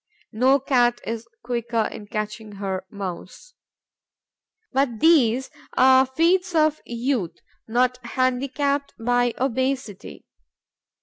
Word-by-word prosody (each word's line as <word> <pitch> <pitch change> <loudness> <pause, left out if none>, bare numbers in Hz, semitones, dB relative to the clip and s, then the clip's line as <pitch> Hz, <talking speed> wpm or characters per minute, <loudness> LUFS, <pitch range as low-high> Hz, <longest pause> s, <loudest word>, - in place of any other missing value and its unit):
No 260 +5 +3
Cat 245 -3 +2
is 230 0 -5 0.2
quicker 235 -2 -1
in 205 - -9
catching 215 0 -5
her 195 -2 -4
Mouse. 200 - -8 1.2
But 260 -4 0
these 265 -6 +3 0.3
are 260 0 +6
the - - -26
feats 355 +5 +2
of 310 -1 +2
youth 235 - -2 0.3
not 250 +2 +1
handicapped 275 +3 -1
by 245 +1 +1
obesity. 260 - -3
245 Hz, 105 wpm, -23 LUFS, 225-270 Hz, 1.2 s, are